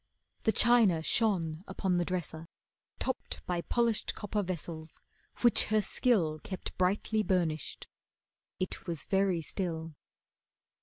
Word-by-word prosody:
The 220 - +5
china 220 -9 +4
shone 175 -7 +1
upon 190 -1 0
the 175 - +1
dresser, 165 -3 -4 0.5
topped 260 0 -3
By 175 -1 -1
polished 235 +2 0
copper 205 0 -2
vessels 165 -3 -5 0.4
which 240 -1 +6
her 215 0 +2
skill 175 - +2
Kept 185 +3 -7
brightly 200 +4 +1
burnished. 170 -7 -1 0.7
It 185 0 -2
was 165 -3 -1
very 190 -4 +1
still. 165 -3 -2
185 Hz, 115 wpm, -31 LUFS, 165-210 Hz, 0.7 s, which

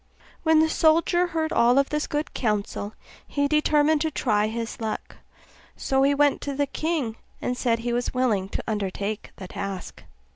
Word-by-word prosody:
When 320 -1 +5
the 320 - +4
soldier 335 +3 +3
heard 320 -2 -1
all 240 +1 +4
this 285 +2 +1
good 295 +1 -3
counsel, 210 -2 -2 0.3
he 285 0 0
determined 300 0 +3
to 320 - +1
try 215 -7 +1
his 230 +1 -4
luck: 220 -1 -4 0.6
so 270 0 0
he 280 +1 +4
went 290 0 +3
to 280 -1 -3
the 285 +1 +1
king, 280 -5 -2 0.2
and 250 - -2
said 235 -2 +1
he 235 +1 -3
was 245 0 -1
willing 220 -7 +1
to - - -4
undertake 205 0 -3
the 190 - -8
task. 195 -1 -6
265 Hz, 170 wpm, -25 LUFS, 220-300 Hz, 0.6 s, When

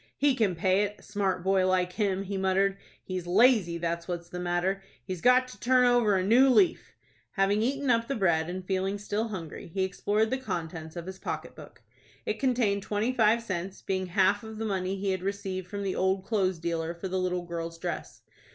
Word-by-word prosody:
"He 285 -1 +3
can 215 -7 +1
pay 185 +4 +2
it,—a 205 0 -3
smart 195 -3 -1
boy 190 0 +3
like 180 -1 +1
him," 195 -2 0
he 200 +1 -5
muttered. 190 +1 +2 0.3
"He's 185 -2 -5
lazy, 200 -3 +4
that's 170 0 -3
what's 175 -1 -5
the 180 - -6
matter. 180 +2 0 0.2
He's 185 -3 -5
got 250 +1 +5
to - - -12
turn 255 0 +4
over 240 -4 +4
a 185 - +1
new 250 +6 +6
leaf." 345 +6 +3 0.4
Having 200 +2 +2
eaten 275 +3 +1
up 230 0 +2
the 275 - -1
bread, 170 -5 +1
and 185 +1 -5
feeling 190 +1 -1
still 210 +2 -2
hungry, 175 -8 -7
he 190 +3 -2
explored 205 +3 0
the 260 - 0
contents 165 -7 -5
of 170 -1 -6
his 190 +1 -8
pocket - - -5
book. - - -13 0.4
It - - -2
contained 240 -7 +1
twenty 215 +4 -1
five 230 -1 +3
cents, 190 -2 -5
being 185 -1 -1
half 195 +3 +2
of 220 0 -8
the 225 - -3
money 190 -2 -1
he 195 0 -1
had 185 -1 -2
received 190 -1 -3
from 200 0 -5
the 195 -1 -2
old 190 0 0
clothes 190 -5 +1
dealer 165 0 -3
for 170 +3 -5
the 185 0 -1
little 180 -1 -1
girl's 165 -1 -5
dress. - - -6
195 Hz, 205 wpm, -28 LUFS, 180-215 Hz, 0.4 s, new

